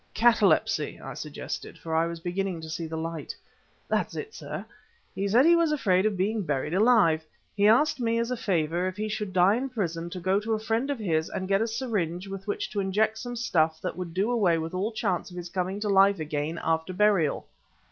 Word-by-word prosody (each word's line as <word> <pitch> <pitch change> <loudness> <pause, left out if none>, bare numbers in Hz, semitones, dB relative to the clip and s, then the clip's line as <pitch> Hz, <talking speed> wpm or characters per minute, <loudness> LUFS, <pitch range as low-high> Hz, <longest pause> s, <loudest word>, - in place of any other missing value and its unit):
"Catalepsy!" 235 0 +3
I - - -7
suggested, - - -6
for 160 - -6
I 165 +1 +2
was 170 0 -5
beginning 180 +1 -2
to 160 - -8
see 165 +1 -4
light. 160 0 -5 0.5
"That's - - -1
it, 435 0 -6
sir! - - -6 0.5
He 200 - -2
said 235 +7 +5
he 340 +1 +7
was 335 -2 +3
afraid 200 -9 +2
of 205 -3 -2
being 210 +4 0
buried 150 -3 -2
alive! 190 -7 +4 0.3
He 205 0 +4
asked 260 +6 +4
me, 230 -1 +1
as 235 +1 -1
a - - +1
favor, 175 -5 0
if 185 +1 -5
he 215 +1 -2
should 210 -2 -3
die 185 +2 +4
in 270 +2 -3
prison 170 -8 -3
to 180 - -6
go 190 +3 +2
to 220 +2 -2
a - - -3
friend 225 +5 -1
of 285 - -1
his 165 -7 0
and 185 - -4
get 195 +1 +2
a 225 - +1
syringe 200 -7 -2
with 195 0 -7
which 205 - -2
to 205 - -2
inject 210 +3 +1
some 245 +1 -5
stuff 160 -9 +1
that - - -3
would 175 -2 -6
do 200 +6 +1
away 195 -8 +3
with 160 +1 -4
all 195 +5 -1
chance 185 -5 -1
of 180 - -11
his 175 0 -6
coming 185 +2 -2
to 210 - -1
life 195 -1 +5
again 155 +1 -3
after 160 +2 0
burial." 195 -6 +2
195 Hz, 220 wpm, -27 LUFS, 170-220 Hz, 0.5 s, he